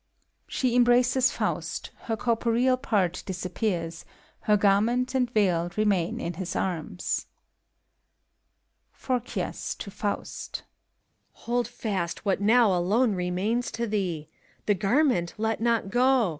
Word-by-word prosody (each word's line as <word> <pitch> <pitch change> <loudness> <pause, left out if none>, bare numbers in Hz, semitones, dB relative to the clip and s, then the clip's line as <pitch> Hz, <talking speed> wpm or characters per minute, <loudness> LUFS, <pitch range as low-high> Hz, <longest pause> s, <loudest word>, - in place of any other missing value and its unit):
(She 250 -2 0
embraces 245 +1 +4
Faust: - - -3
her 225 -1 -1
corporeal 235 +3 +2
part 205 -9 0
disappears 180 -3 -3 0.4
^ - - -21
her 210 -1 +5
garment 220 +6 +2
and 255 -2 +1
veil 180 -7 +2
remain 200 -5 +1
in 170 - -3
his 180 +1 -5
arms,) 180 +1 -2 1.7
PHORKYAS 250 -2 -3
(to 200 - -8
Faust). 205 0 -4 0.8
Hold 240 +1 0
fast 205 -7 -3
what 195 0 +1
now 220 0 +5
alone 210 +7 +2
remains 190 +7 -1
to 235 - -1
thee 185 -8 -2 0.3
f - - -44
The 210 - +3
garment 200 - +1
let 220 +1 -1
not 230 -4 +1
go 250 -3 +3
215 Hz, 120 wpm, -27 LUFS, 185-245 Hz, 1.7 s, her